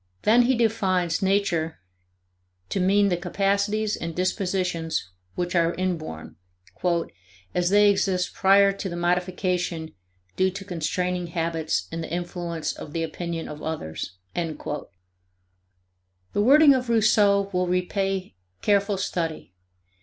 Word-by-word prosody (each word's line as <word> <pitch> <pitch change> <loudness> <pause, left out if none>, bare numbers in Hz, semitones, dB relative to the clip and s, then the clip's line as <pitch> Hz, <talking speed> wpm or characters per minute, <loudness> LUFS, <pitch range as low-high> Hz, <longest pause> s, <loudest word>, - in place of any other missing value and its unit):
Then 230 +3 +6
he 255 +2 +3
defines 190 -7 +1
Nature 190 -5 +1 0.9
to - - -1
mean 200 +2 +4
the 175 - +1
capacities 200 +4 0
and 165 -1 -5
dispositions 180 - -1 0.3
which 175 0 -2
are 170 0 +2
inborn, 160 - -4 1.2
"as 180 0 +1
they 205 +1 +6
exist 185 -2 0
prior 195 +1 +5
to 195 0 -5
the 170 - -5
modification 180 -1 -1 0.4
due 185 0 +3
to 195 +1 -8
constraining 180 0 -2
habits 165 -1 -1
and 165 0 -4
the - - -6
influence 175 -1 -3
of 150 - -9
the 165 - -1
opinion 165 +1 -4
of 150 0 -8
others." 90 - -5 0.2
The 165 -3 -3 1.8
wording 285 +5 +7
of 255 -2 -1
Rousseau 205 -3 +3
will 180 0 +1
repay 185 - -1 0.3
careful 200 0 +2
study. 165 - -3
180 Hz, 120 wpm, -25 LUFS, 170-200 Hz, 1.8 s, wording